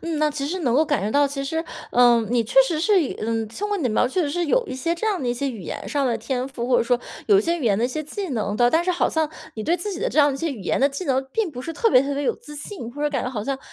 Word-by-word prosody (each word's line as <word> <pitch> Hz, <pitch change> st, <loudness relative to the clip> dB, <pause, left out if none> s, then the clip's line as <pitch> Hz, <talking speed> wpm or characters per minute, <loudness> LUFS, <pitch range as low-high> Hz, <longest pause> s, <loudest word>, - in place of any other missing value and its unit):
嗯， 330 Hz, -2 st, -3 dB
那 305 Hz, 0 st, +2 dB
其 280 Hz, -1 st, -3 dB
实 365 Hz, +5 st, -3 dB
能 250 Hz, -7 st, +1 dB
够 300 Hz, -, +5 dB
感 290 Hz, -9 st, 0 dB
觉 205 Hz, -, -1 dB
到 285 Hz, +4 st, +4 dB
其 275 Hz, 0 st, -4 dB
实， 320 Hz, +4 st, -2 dB, 0.3 s
呃， 240 Hz, -1 st, +5 dB
你 245 Hz, -1 st, +3 dB
确 235 Hz, +4 st, +1 dB
实 310 Hz, +1 st, -1 dB
是 395 Hz, -1 st, +4 dB
一 280 Hz, -, -3 dB
嗯， 225 Hz, 0 st, -1 dB
通 390 Hz, -, -5 dB
过 415 Hz, -, 0 dB
你 365 Hz, -, -3 dB
的 250 Hz, -, +1 dB
描 230 Hz, +3 st, +2 dB
述， 335 Hz, +4 st, 0 dB
是 340 Hz, +4 st, -1 dB
有 480 Hz, +10 st, +2 dB
一 260 Hz, -, -5 dB
些 330 Hz, +6 st, -1 dB
这 440 Hz, +6 st, -3 dB
样 395 Hz, -8 st, 0 dB
的 250 Hz, -, -1 dB
一 240 Hz, -, 0 dB
些 275 Hz, +3 st, -2 dB
语 225 Hz, -5 st, -8 dB
言 170 Hz, -, -6 dB
上 280 Hz, -3 st, 0 dB
的 235 Hz, -, +1 dB
天 250 Hz, +3 st, -3 dB
赋， 245 Hz, -3 st, -5 dB
或 250 Hz, -1 st, +3 dB
者 -, -, +3 dB
说 245 Hz, +1 st, +1 dB, 0.3 s
有 405 Hz, -, +6 dB
一 -, -, +2 dB
些 340 Hz, +1 st, 0 dB
语 290 Hz, -, -4 dB
言 200 Hz, -4 st, +3 dB
的 230 Hz, -, +1 dB
一 -, -, +1 dB
些 310 Hz, +4 st, -3 dB
技 365 Hz, +3 st, -5 dB
能 210 Hz, -4 st, -2 dB
的， 240 Hz, +1 st, +4 dB
但 325 Hz, +5 st, +3 dB
是 365 Hz, -, 0 dB
好 355 Hz, -, +2 dB
像 320 Hz, -1 st, 0 dB, 0.2 s
你 215 Hz, -, -6 dB
对 340 Hz, +7 st, +1 dB
自 400 Hz, +4 st, -4 dB
己 360 Hz, -, -6 dB
的 -, -, +1 dB
这 310 Hz, -, -2 dB
样 290 Hz, -, +7 dB
的 -, -, -3 dB
一 -, -, -6 dB
些 325 Hz, +2 st, -1 dB
语 230 Hz, -8 st, -7 dB
言 -, -, 0 dB
的 275 Hz, -, +5 dB
技 280 Hz, +6 st, -5 dB
能 265 Hz, -3 st, +1 dB
并 435 Hz, -1 st, -1 dB
不 250 Hz, -4 st, -7 dB
是 330 Hz, +5 st, -6 dB
特 455 Hz, -, +2 dB
别 250 Hz, -, +7 dB
特 280 Hz, +1 st, -2 dB
别 285 Hz, -, -2 dB
有 275 Hz, -, +1 dB
自 295 Hz, 0 st, -12 dB
信， 290 Hz, -, -7 dB
或 290 Hz, +4 st, -6 dB
者 295 Hz, -, +1 dB
感 275 Hz, -4 st, -1 dB
觉 -, -, -2 dB
好 220 Hz, -5 st, -4 dB
像 275 Hz, +1 st, -2 dB
280 Hz, 385 characters per minute, -23 LUFS, 245-330 Hz, 0.3 s, 样